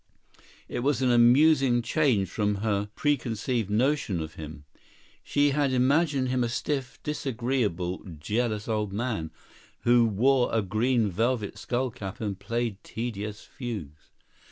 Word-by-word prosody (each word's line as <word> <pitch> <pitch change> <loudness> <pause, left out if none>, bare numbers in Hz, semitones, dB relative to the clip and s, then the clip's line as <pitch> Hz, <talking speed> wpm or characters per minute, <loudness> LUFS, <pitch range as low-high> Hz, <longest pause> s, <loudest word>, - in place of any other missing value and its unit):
It - - -4
was 135 +1 +1
an 125 - +3
amusing 125 +1 +5
change 120 -7 +2
from 105 +3 0
her 105 -1 0
preconceived 120 -5 -1
notion 115 - +1
of 80 0 -5
him. 75 -1 -9 0.6
She 145 0 +2
had 140 -1 +1
imagined 135 +1 +2
him 125 -1 +1
a 120 - -1
stiff, 135 +1 -3
disagreeable, 120 - -2 0.2
jealous 105 +5 -1
old 105 -3 -1
man, 105 -7 -2 0.5
who 120 -1 +4
wore 125 +5 +3
a 110 -2 +1
green 110 +2 +1
velvet 115 +2 0
skull 125 0 -1
cap 95 -1 -7
and 100 -4 -3
played 115 0 -3
tedious 105 -2 -5
fugues. 100 - -7
120 Hz, 130 wpm, -27 LUFS, 105-130 Hz, 0.6 s, amusing